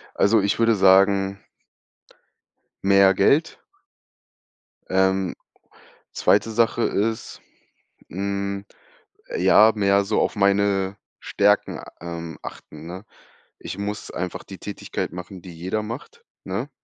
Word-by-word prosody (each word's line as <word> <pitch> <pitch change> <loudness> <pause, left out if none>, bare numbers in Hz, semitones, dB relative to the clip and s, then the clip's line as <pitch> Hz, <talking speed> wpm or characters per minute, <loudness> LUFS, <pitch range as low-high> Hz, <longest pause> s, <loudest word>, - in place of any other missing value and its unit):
Also 105 +1 +4
ich 100 +3 0
würde 115 -1 +4
sagen 95 0 +4 1.4
mehr 100 0 +5
Geld. 140 - +2 1.3
Ähm. 95 -1 +1 0.8
2. 115 - +2
Sache 115 +1 +1
ist, 110 +2 -2 0.7
hm, 100 +1 -3 0.7
ja 110 +1 +6
mehr 100 -1 +3
so 105 - +1
auf - - -1
meine 100 -1 +2 0.2
Stärken, 105 0 +1 0.2
ähm, 85 -1 -7
achten, 75 +1 -10
ne? 90 +5 -8 0.5
Ich - - -7
muss 105 +1 -5
einfach 90 0 -5
die 95 - -10
Tätigkeit 100 -4 -5
machen, 90 0 -9
die 90 -3 -11
jeder 95 +6 -3
macht, 140 - -8 0.2
ne? - - -4
100 Hz, 105 wpm, -23 LUFS, 95-105 Hz, 1.4 s, ja